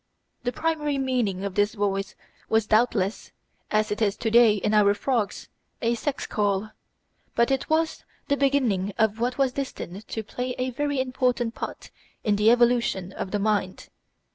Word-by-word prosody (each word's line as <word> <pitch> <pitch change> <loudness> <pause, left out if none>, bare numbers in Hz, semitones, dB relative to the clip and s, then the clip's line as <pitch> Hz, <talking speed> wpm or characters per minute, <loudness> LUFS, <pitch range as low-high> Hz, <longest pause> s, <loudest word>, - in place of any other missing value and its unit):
The 245 - -1
primary 300 +1 -1
meaning 245 -8 0
of 200 - -3
this 205 +3 +1
voice 195 -1 -1 0.3
was 220 -1 +3
doubtless, 215 -2 +1 0.4
as 215 0 +1
it 210 - -2
is 205 -2 +1
to 225 - -2
day 230 -2 +6
in 210 +1 -1
our 205 -1 +5
frogs, 230 -2 -1 0.3
a 235 0 +1
sex 270 +4 -3
call; 205 0 -1 0.6
but 235 +3 +3
it 270 +2 -1
was 315 +1 +1 0.2
the 285 - +2
beginning 250 -9 +1
of 220 -1 +2
what 245 +1 -1
was 270 -2 +2
destined 215 -7 -6
to 220 - -4
play 250 +4 -4
a 255 0 -1
very 285 +2 -1
important 255 -2 0
part - - -7 0.3
in 210 -2 +2
the 210 +2 +4
evolution 240 -6 +2
of - - -4
the 205 - -1
mind. 205 -2 -1
225 Hz, 165 wpm, -25 LUFS, 205-255 Hz, 0.6 s, day